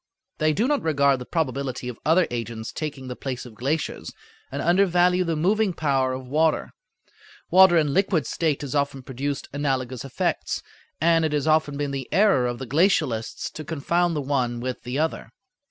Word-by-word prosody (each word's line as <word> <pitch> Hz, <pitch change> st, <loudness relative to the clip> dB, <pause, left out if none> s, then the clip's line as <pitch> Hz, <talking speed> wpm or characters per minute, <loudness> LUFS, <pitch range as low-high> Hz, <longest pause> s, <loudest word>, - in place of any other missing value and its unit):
They 155 Hz, 0 st, +3 dB
do 215 Hz, +10 st, +1 dB
not 290 Hz, 0 st, +1 dB
regard 140 Hz, -4 st, +2 dB
the 125 Hz, -, -8 dB
probability 135 Hz, -5 st, -2 dB
of 125 Hz, -2 st, -6 dB
other 165 Hz, +3 st, +4 dB
agents 115 Hz, -1 st, -4 dB
taking 145 Hz, -4 st, -5 dB
the 125 Hz, -, -5 dB
place 130 Hz, -2 st, -5 dB
of 120 Hz, -, -11 dB
glaciers, 140 Hz, +8 st, -3 dB, 0.4 s
and 140 Hz, -, -4 dB
undervalue 180 Hz, +1 st, +3 dB
the 165 Hz, -2 st, -1 dB
moving 195 Hz, +5 st, +2 dB
power 135 Hz, -5 st, +1 dB
of 130 Hz, 0 st, -6 dB
water. 155 Hz, +4 st, +1 dB, 0.8 s
Water 185 Hz, -1 st, +7 dB
in 150 Hz, -3 st, +2 dB
liquid 185 Hz, -5 st, +2 dB
state 155 Hz, -4 st, -1 dB
has 140 Hz, -, -5 dB
often 140 Hz, -2 st, -1 dB
produced 135 Hz, +2 st, -4 dB
analogous 130 Hz, -4 st, -2 dB
effects, 135 Hz, -3 st, -2 dB, 0.4 s
and 165 Hz, +1 st, +3 dB
it 155 Hz, -1 st, 0 dB
has 145 Hz, -2 st, 0 dB
often 155 Hz, -2 st, +2 dB
been 145 Hz, -1 st, -2 dB
the 135 Hz, -2 st, -5 dB
error 190 Hz, -11 st, +4 dB
of 120 Hz, 0 st, -3 dB
the 130 Hz, -, -6 dB
glacialists 130 Hz, -, +1 dB
to 155 Hz, -, -7 dB
confound 170 Hz, +3 st, 0 dB
the 150 Hz, -, -1 dB
one 130 Hz, -4 st, -1 dB
with 125 Hz, +1 st, -4 dB
the 125 Hz, +2 st, -4 dB
other. 160 Hz, +2 st, -2 dB
145 Hz, 180 wpm, -24 LUFS, 130-165 Hz, 0.8 s, Water